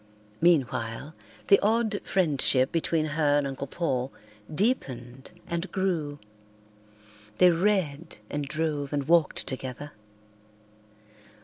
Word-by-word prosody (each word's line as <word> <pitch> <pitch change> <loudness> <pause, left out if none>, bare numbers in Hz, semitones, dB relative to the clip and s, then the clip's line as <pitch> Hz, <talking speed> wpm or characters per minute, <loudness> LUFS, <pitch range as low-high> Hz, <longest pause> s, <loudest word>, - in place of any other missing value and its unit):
Meanwhile, 140 -4 +1 0.3
the 200 - +7
odd 220 0 +1
friendship 140 -7 +2
between 165 -1 +1
her 145 -1 +2
and 145 - +1
Uncle 135 0 -4
Paul 135 -5 -2 0.4
deepened 135 - -2 0.2
and 170 +2 -4
grew. 170 -7 -1 1.2
They 180 -1 +7
read 170 -4 0
and 145 +2 -3
drove 150 -2 -2
and 140 -1 -1
walked 170 -2 +3
together. 130 +2 -5
150 Hz, 100 wpm, -27 LUFS, 140-170 Hz, 1.2 s, the